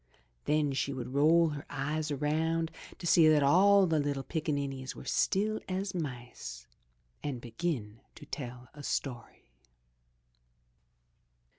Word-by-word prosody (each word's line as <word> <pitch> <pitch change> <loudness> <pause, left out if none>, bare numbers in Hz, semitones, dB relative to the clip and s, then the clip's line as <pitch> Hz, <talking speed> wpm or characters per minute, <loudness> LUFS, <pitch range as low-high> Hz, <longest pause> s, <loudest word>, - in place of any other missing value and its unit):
Then 150 -1 +2
she 140 +1 -1
would 130 -1 -5
roll 160 +4 +5
her 145 -1 -5
eyes 150 +2 -2
around 160 +3 0 0.3
to - - -8
see 165 -1 +6
that 150 -2 +5
all 195 +7 +6
the 160 -3 +2
little 140 -2 -1
pickaninnies 140 -5 -3
were - - -10
still 215 +2 +1
as 190 +1 -2
mice 120 - -6 0.6
and 140 -4 -3
begin 115 -3 -3 0.2
to 150 - -11
tell 125 -4 -7
a 150 - -10
story. 120 - -4
145 Hz, 125 wpm, -31 LUFS, 135-165 Hz, 0.6 s, see